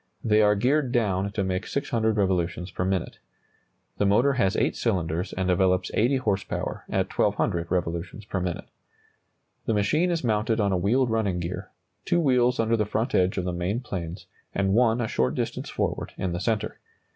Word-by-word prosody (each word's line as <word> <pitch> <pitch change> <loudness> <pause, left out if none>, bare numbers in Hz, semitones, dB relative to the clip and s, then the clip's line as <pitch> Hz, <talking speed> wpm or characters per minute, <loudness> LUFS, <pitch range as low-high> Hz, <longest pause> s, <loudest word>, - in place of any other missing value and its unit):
They 110 -1 +4
are 105 0 +4
geared 130 +5 +1
down 100 -5 +1
to 100 - 0
make 95 0 -2
600 110 -5 0
revolutions 90 -2 0
per 90 - -2
minute. 95 -2 -2 0.8
The 100 - +3
motor 120 +8 +4
has 115 -6 +1
8 - - +1
cylinders 90 -5 -1
and 95 0 -2
develops 90 0 +2
80 120 +6 +3
horse 105 -6 0
power - - -4
at - - -1
1,200 85 -1 +1
revolutions 90 +3 -2
per 100 - -3
minute. 90 -1 -3 1.0
The 115 - +2
machine 150 - +2
is 170 -3 -1
mounted 110 0 +1
on 100 -2 +2
a - - +2
wheeled 115 +7 +2
running 105 -5 0
gear, 85 +2 -5 0.3
two 175 - +1
wheels 125 -5 +3
under 115 0 +2
the 110 - +1
front 110 +4 -1
edge 95 +1 +2
of 90 - -1
the 90 - -2
main 90 +6 -1
planes 90 -7 -6 0.3
and 95 0 +1
one 120 +1 +3
a 110 - 0
short 65 -9 0
distance - - -3
forward - - -2
in 95 - -2
the 85 - -2
centre. 110 +2 -1
100 Hz, 185 wpm, -26 LUFS, 90-115 Hz, 1.0 s, They